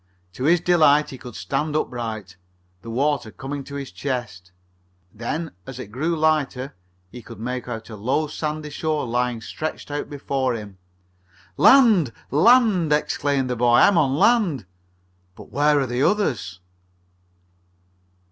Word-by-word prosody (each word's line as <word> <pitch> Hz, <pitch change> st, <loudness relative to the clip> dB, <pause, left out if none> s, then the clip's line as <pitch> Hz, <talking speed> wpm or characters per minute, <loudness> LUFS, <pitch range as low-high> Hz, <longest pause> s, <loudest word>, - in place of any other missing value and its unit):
To 130 Hz, -, -4 dB
his 170 Hz, +3 st, +4 dB
delight 155 Hz, -4 st, +4 dB
he 130 Hz, -, -9 dB
could 120 Hz, -3 st, -10 dB
stand 150 Hz, +2 st, -2 dB
upright, 110 Hz, -9 st, -4 dB, 0.5 s
the 115 Hz, -, -10 dB
water 135 Hz, 0 st, 0 dB
coming 135 Hz, +5 st, -6 dB
to 140 Hz, -, -9 dB
his 140 Hz, -5 st, -6 dB
chest. 100 Hz, -4 st, -5 dB, 0.6 s
Then, 150 Hz, +9 st, -4 dB, 0.2 s
as 135 Hz, -, -8 dB
it 115 Hz, -5 st, -8 dB
grew 155 Hz, +8 st, -1 dB
lighter, 150 Hz, -3 st, 0 dB, 0.4 s
he 125 Hz, -, -9 dB
could -, -, -12 dB
make 125 Hz, +2 st, -4 dB
out 115 Hz, -2 st, -6 dB
a -, -, -7 dB
low, 130 Hz, +9 st, 0 dB
sandy 150 Hz, 0 st, -4 dB
shore 155 Hz, -1 st, -2 dB
lying 120 Hz, -1 st, -1 dB
stretched 155 Hz, +5 st, -6 dB
out 145 Hz, -, -4 dB
before 135 Hz, -3 st, -2 dB
him. 100 Hz, -4 st, -9 dB, 0.8 s
"Land! 215 Hz, -, +5 dB, 0.2 s
Land!" 195 Hz, -, +4 dB
exclaimed 145 Hz, -2 st, 0 dB
the 125 Hz, -, -2 dB
boy. 120 Hz, 0 st, +3 dB
"I'm 200 Hz, -, +6 dB
on 135 Hz, -3 st, +2 dB
land! 175 Hz, -, +2 dB, 0.7 s
But -, -, -14 dB
where 145 Hz, +1 st, +3 dB
are 135 Hz, -, 0 dB
the 120 Hz, 0 st, -2 dB
others?" 120 Hz, -, 0 dB
135 Hz, 145 wpm, -22 LUFS, 120-155 Hz, 0.8 s, I'm